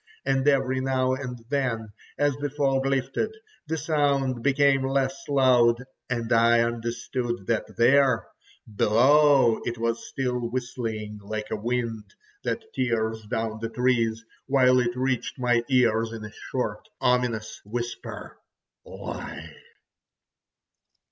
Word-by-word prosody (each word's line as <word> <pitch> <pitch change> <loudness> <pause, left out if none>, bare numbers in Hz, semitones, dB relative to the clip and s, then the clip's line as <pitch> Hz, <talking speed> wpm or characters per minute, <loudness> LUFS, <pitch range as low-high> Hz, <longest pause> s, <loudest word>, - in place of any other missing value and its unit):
And 135 0 +1
every 135 -2 +2
now 130 -1 +1
and 125 -3 -6
then, 120 -7 -1 0.2
as 145 -1 +2
the 145 0 -2
fog 135 -1 +1
lifted, 135 - -1 0.3
the 160 +1 -1
sound 140 -5 +1
became 140 0 +3
less 135 0 -1
loud, 125 -3 +4 0.3
and 120 -1 -1
I 115 0 +5
understood 120 -1 -3
that 115 0 -2
there—below—it 125 0 +3
was 115 0 -2
still 125 -2 -2
whistling 115 -4 -4
like 105 +1 -5
a - - 0
wind, 115 -1 -3 0.3
that 220 -1 -4
tears 110 -4 -1
down 110 0 -2
the 115 - -2
trees, 115 -2 +1 0.2
while 130 -2 +4
it 120 -1 0
reached 130 0 -1
my 120 -2 +2
ears 115 -3 +3
in 110 -1 -7
a 105 - -9 0.2
short, - - -3
ominous 120 -3 0
whisper: 120 +3 -6 0.4
"Lie!" - - -8
125 Hz, 115 wpm, -26 LUFS, 115-135 Hz, 0.4 s, I